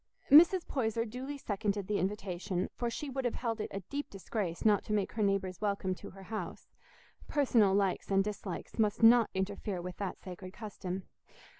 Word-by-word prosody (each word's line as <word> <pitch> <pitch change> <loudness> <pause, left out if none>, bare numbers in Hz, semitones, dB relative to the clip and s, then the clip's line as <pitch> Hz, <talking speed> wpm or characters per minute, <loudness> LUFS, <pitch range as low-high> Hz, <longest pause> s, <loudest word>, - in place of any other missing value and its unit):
Mrs. 340 +4 +8
Poyser 230 -3 0
duly 255 +5 -5
seconded 205 -4 -2
the 205 +1 0
invitation, 190 -1 -2
for 240 - -2
she 290 +5 -4
would 265 0 -3
have 245 - 0
held 230 -3 -2
it - - -3
a 195 - -4
deep 285 +10 -5
disgrace 195 -2 -4
not 210 -2 +5
to 210 - -2
make 205 -2 +1
her 220 - -3
neighbours 195 -2 0
welcome 200 -2 0
to - - -9
her 195 0 -12
house: 215 +3 -6 0.6
personal 235 -9 +3
likes 195 -2 +1
and 195 0 +4
dislikes 205 0 -5
must 210 +1 +2
not 230 0 +7
interfere 190 0 -2
with 180 +1 -6
that 195 -2 -4
sacred 185 0 -9
custom. 195 -3 -5
205 Hz, 180 wpm, -32 LUFS, 190-230 Hz, 0.6 s, Mrs